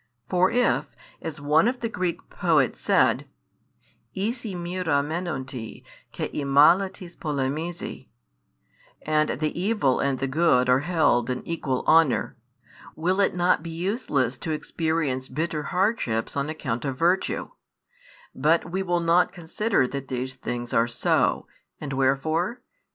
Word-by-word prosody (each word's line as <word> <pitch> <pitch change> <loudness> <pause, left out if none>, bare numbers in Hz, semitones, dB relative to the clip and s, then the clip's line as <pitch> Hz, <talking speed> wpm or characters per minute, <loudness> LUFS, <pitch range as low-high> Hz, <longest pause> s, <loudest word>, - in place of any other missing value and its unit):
For 185 +1 +3
if, 245 +1 +1 0.3
as 160 -2 -6
one 150 +7 +3
of 250 +1 -2
the 230 - 0
Greek 185 -6 -3
poets - - +1
said: - - +2 0.9
11 200 +4 0
Ἴση 230 -6 -6
μοῖρα 175 -5 0
μένοντι, 135 -8 -5 0.3
καὶ - - -5
εἰ 140 - -3
μάλα 165 +8 +5
τις 175 -2 -11
πολεμίζοι, 150 +4 -3 1.0
and 155 0 +1
the 155 +2 -2
evil 195 - +1
and 135 -1 0
the 135 - -2
good 135 -3 +3
are 125 +1 +5
held 150 -7 +2
in 125 0 -4
equal 140 -6 -2
honour, 160 -4 +3 0.6
will 180 +5 0
it 195 - +2
not 180 -3 +2
be 165 - -7
useless 165 - -1
to - - -5
experience 155 -4 -1
bitter 155 +3 -2
hardships 180 - -1
on 140 +1 -1
account 130 -7 -3
of 135 -3 -3
virtue? 175 +5 +1 0.8
But 160 +4 +1
we 190 +2 -1
will 175 -2 0
not 170 +1 +3
consider 175 - 0
that 135 0 -5
these 130 +1 -3
things 120 -2 -5
are 115 +1 +3
so, 120 - +1 0.3
and 140 -2 -5
wherefore? 155 - 0
160 Hz, 140 wpm, -25 LUFS, 135-175 Hz, 1.0 s, μάλα